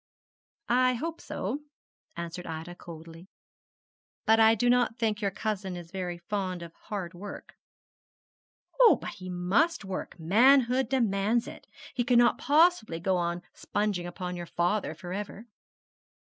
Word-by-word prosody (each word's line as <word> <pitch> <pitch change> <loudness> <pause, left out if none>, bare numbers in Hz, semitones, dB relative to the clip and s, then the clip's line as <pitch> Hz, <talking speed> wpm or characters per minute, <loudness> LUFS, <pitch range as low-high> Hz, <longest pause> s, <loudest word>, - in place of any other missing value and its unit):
'I 255 +1 +3
hope 325 +7 -4
so,' 225 +10 -3 0.6
answered 170 +1 -6
Ida, 165 +2 -6
coldly; 165 +1 -11 1.0
'but 220 +1 +5
I 220 0 +7
do 245 +3 +1
not 245 -1 +3
think 220 -2 0
your 200 - +1
cousin 195 -2 -3
is 170 -1 -10
very 180 -2 -4
fond 185 -1 -3
of 170 -1 -10
hard 190 -4 -6
work.' 200 +3 -9 1.3
'Oh, - - +8
but - - -6
he 185 -3 -9
must 200 - +1
work 185 -2 -5
manhood 250 +7 +4
demands 230 -2 +1
it. - - -10 0.3
He 250 -2 0
cannot 240 +1 +4
possibly 295 - +3
go 185 +2 +1
on 175 0 -1
sponging 205 -4 -2
upon 180 0 -5
your 175 -1 -6
father 175 0 0
for 175 +2 -7
ever.' 205 +2 -6
200 Hz, 140 wpm, -29 LUFS, 175-240 Hz, 1.3 s, Oh